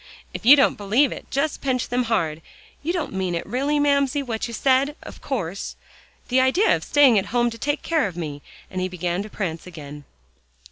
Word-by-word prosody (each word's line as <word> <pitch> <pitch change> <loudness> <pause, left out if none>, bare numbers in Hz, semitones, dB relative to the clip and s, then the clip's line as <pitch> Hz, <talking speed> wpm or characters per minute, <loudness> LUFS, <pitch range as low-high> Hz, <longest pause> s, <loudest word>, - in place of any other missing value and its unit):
"If 230 - -5
you 280 - +11
don't 275 -6 +3
believe 225 +8 +2
it, - - -8
just 285 +2 -1
pinch 255 -3 -1
them 245 0 0
hard. 165 -9 -1 0.4
You 320 - -1
don't 350 - -3
mean 185 -2 -1
it 170 - -3
really, 275 +7 0
Mamsie, 280 0 +2
what 230 -3 -3
you - - -8
said, 270 +4 +2
of - - -11
course. 200 - -4 0.5
The 260 +1 +4
idea 305 +12 +3
of - - -5
staying 270 -7 +5
at 195 - -5
home 240 +1 +1
to 230 - -9
take 290 +4 -1
care 320 -8 +1
of 180 -3 -9
me," 150 -4 -5 0.3
and 185 -1 -3
he 185 - 0
began 180 0 -2
to 210 - -7
prance 175 -5 -4
again. 150 -4 -10
235 Hz, 205 wpm, -23 LUFS, 185-280 Hz, 0.5 s, you